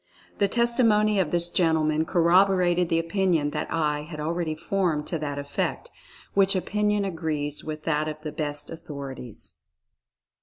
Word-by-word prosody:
The 200 - +3
testi 235 +2 +2
mony 210 -2 +3
of 180 -5 +1
this 175 0 0
gentleman 160 -2 +2
corroborated 180 0 +3
the 165 - +2
opinion 165 -3 +1
that - - -4
I 150 -2 0
had 150 0 -8
already 160 +1 -2
formed 165 -3 -1
to 165 - -3
that 145 -2 -4
effect, 145 - -3 0.4
which 195 0 +4
opinion 210 +2 0
agrees 155 -5 -3
with 155 0 -6
that 155 -1 0
of 155 -1 -4
the 155 - -4
best 145 -1 -3
authorities. 140 -7 -8
165 Hz, 150 wpm, -25 LUFS, 150-190 Hz, 0.4 s, which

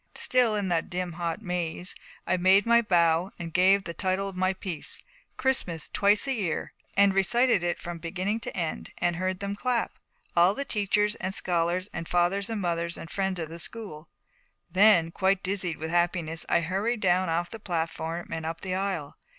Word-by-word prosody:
Still 245 -4 +2
in 205 -2 -1
that 170 -2 0
dim 180 0 -3
hot 170 +4 -4
maze, 180 -1 -2 0.3
I - - +2
made 190 +3 +4
my 235 0 +5
bow 170 -3 +3
and 165 -2 -7
gave 190 +2 +4
the 170 - -5
title 190 +3 -1
of 195 - -7
my 185 +1 +2
piece, 185 -5 -3 0.3
'Christmas 180 - 0
Twice 205 +3 +3
a 270 - +1
Year,' 195 -10 -2 0.2
and 200 -1 +6
recited 235 +3 +3
it 175 0 -1
from 175 -1 -6
beginning 190 +6 -2
to - - -6
end, 165 -3 -3
and 175 -1 0
heard 185 +1 -2
them 200 0 -3
clap, 245 +2 0 0.4
all 175 +3 +5
the 280 - -2
teachers 210 -1 +1
and 190 -3 -4
scholars 175 +1 0
and 165 -1 -5
Fathers 180 +4 +1
and 225 -2 -2
Mothers 170 -2 -1
and 165 - -9
Friends 190 -2 -1
of 160 -2 -4
the 165 +1 -8
School. 170 -8 -2 0.6
Then, 185 -3 +5
quite 190 +2 +1
dizzied 185 -3 -2
with 160 +1 -4
happiness, 170 -2 0
I - - +3
hurried 200 +7 -1
down 185 -1 +2
off 170 +1 -1
the 225 - -7
platform 165 -2 -3
and 160 - -3
up 165 +1 -4
the 185 -1 -3
aisle. 185 -6 -3
185 Hz, 190 wpm, -27 LUFS, 170-200 Hz, 0.6 s, and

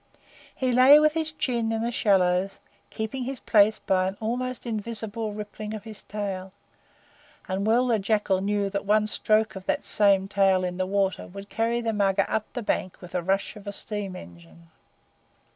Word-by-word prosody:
He 255 -1 0
lay 260 +4 +8
with 305 0 +3
his 320 -1 -1
chin 240 -7 -1
in 225 0 -1
the 235 - -1
shallows, 190 -4 +2 0.3
keeping 220 +4 -4
his 265 -1 -5
place 215 0 +4
by 185 -1 +1
an 190 +1 -5
almost 250 +3 -3
invisible 220 -1 -3
rippling 210 +1 -6
of 210 - -8
his 220 -2 -8
tail, 195 -2 -5 0.9
and 195 +1 -2
well 240 +3 +3
the 235 -3 +2
Jackal 200 -2 +1
knew 205 0 0
that 200 - -2
one 215 +1 +3
stroke 215 0 +1
of 190 -1 -9
that - - 0
same 195 -2 +3
tail 195 -2 +2
in 180 0 -3
the 185 0 -1
water 195 -1 0
would 200 +2 -10
carry 230 +1 0
the 225 -1 -1
Mugger 195 -2 +2
up 220 -1 -2
the 245 - -4
bank 185 -3 -2
with 180 -2 -11
the 180 - -1
rush 195 +5 -1
of 210 -1 -12
a - - -2
steam 200 -2 -4
engine. 85 - -14
210 Hz, 185 wpm, -26 LUFS, 195-225 Hz, 0.9 s, lay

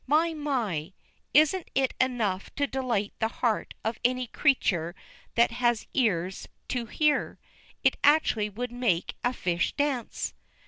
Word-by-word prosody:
My! 320 +4 +3
My! 230 - -2 0.4
Isn't 310 +5 +4
it 265 -1 +2
enough 225 -7 0
to 285 - +1
delight 250 -7 -1
the 220 - +2
heart 225 -1 -1
of 225 0 -1
any 255 +1 +2
creature 185 - +1 0.4
that 235 0 +4
has 240 -1 +1
ears 190 -7 0 0.2
to 240 -2 -2
hear? 300 +4 +1 0.5
It - - +3
actually 285 -8 +4
would 240 +4 -5
make 240 -8 0
a 245 - +2
fish 175 -8 -1
dance. 285 -5 -1
245 Hz, 135 wpm, -28 LUFS, 210-275 Hz, 0.5 s, Isn't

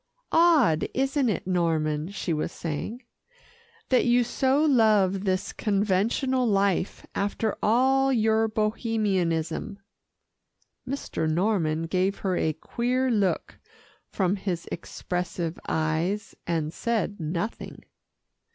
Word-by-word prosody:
"Odd, 310 - +4
isn't 270 0 +1
it, 195 - -2
Norman," 160 -3 0
she 195 -4 -3
was 155 - -2
saying, 175 - -5 0.9
"that 255 - +4
you 245 0 +4
so 265 +5 +1
love 210 -8 +3
this 185 0 -1
conventional 215 +6 +1
life 195 -3 0
after 205 +2 -1
all 265 +4 +3
your 220 -2 +2
Bohemianism." 215 -4 -1 1.1
Mr. 250 - -2
Norman 165 -2 +1
gave 185 +4 0
her 185 -1 +1
a 160 - +1
queer 250 - -1
look 205 -5 0 0.5
from 190 0 0
his 180 -3 -4
expressive 175 -1 -4
eyes, 160 +6 -1
and 160 -2 -1
said 220 -3 -2
nothing. 170 +7 -4
200 Hz, 105 wpm, -26 LUFS, 170-235 Hz, 1.1 s, Odd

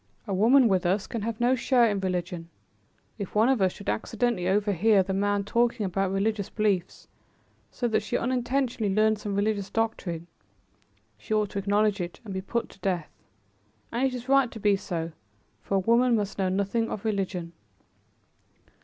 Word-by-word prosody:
A 200 - -3
woman 235 +7 +5
with 190 -4 +2
us 190 +3 +1
can 230 - -4
have 225 +1 -3
no 240 +2 +3
share 250 -1 +3
in 205 -2 0
religion. 180 -2 -3 0.7
If 200 0 -6
one 220 +4 +4
of 260 -6 +2
us 190 -1 +3
should 200 - -12
accidentally 225 -4 -1
overhear 205 +1 +3
the 190 +1 -3
men 205 +1 +1
talking 235 +1 +1
about 195 +1 0
religious 200 +1 -1
beliefs, 200 -5 -1 0.6
so 245 - -2
that 220 -2 +1
she - - -2
unintentionally 245 -3 0
learned 215 +1 +2
some 205 -2 -4
religious 205 -1 0
doctrine, 195 -7 -2 0.9
she 215 - -2
ought 210 -2 0
to 200 - -2
acknowledge 205 0 +1
it 175 0 -6
and 200 - -6
be 190 - -3
put 235 +4 -3
to - - -17
death. 180 -6 -2 0.8
And 240 +3 -1
it 255 - -4
is 250 0 -7
right 275 -2 +4
to 225 - -9
be 205 -1 +3
so, 170 -3 -4 0.5
for 195 - -2
a - - +4
woman 235 +5 +3
must 205 -2 -2
know 190 -1 +1
nothing 200 +4 0
of 205 - -5
religion." 190 -5 -2
205 Hz, 180 wpm, -27 LUFS, 190-230 Hz, 0.9 s, woman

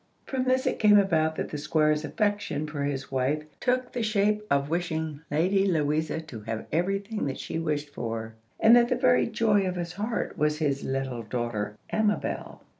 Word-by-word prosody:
From 260 -1 -2
this 260 0 +2
it - - 0
came 210 -1 +7
about 160 -5 +2
that - - -3
the 150 - -4
Squire's 155 0 +2
affection 205 -5 -1
for 150 -1 -5
his 135 -2 -3
wife 135 +3 0 0.2
took 255 0 0
the 245 - -2
shape 210 -1 +2
of 140 0 +2
wishing 160 -2 -2
Lady 190 +6 +2
Louisa 155 -2 0
to 155 -8 -9
have 110 +1 -5
every 180 +5 +1
thing 205 -3 -4
that 135 - -3
she 160 - -4
wished 150 -3 -2
for, 115 -4 -5 0.3
and 230 +2 +7
that 240 0 +5
the - - +2
very 250 0 +3
joy 220 -2 +2
of 180 - -2
his 175 -1 -4
heart 210 +5 -3
was 150 0 +2
his 145 -3 0
little 130 -2 -2
daughter 110 -2 -3 0.2
Amabel. 215 -1 -1
160 Hz, 190 wpm, -27 LUFS, 145-205 Hz, 0.3 s, came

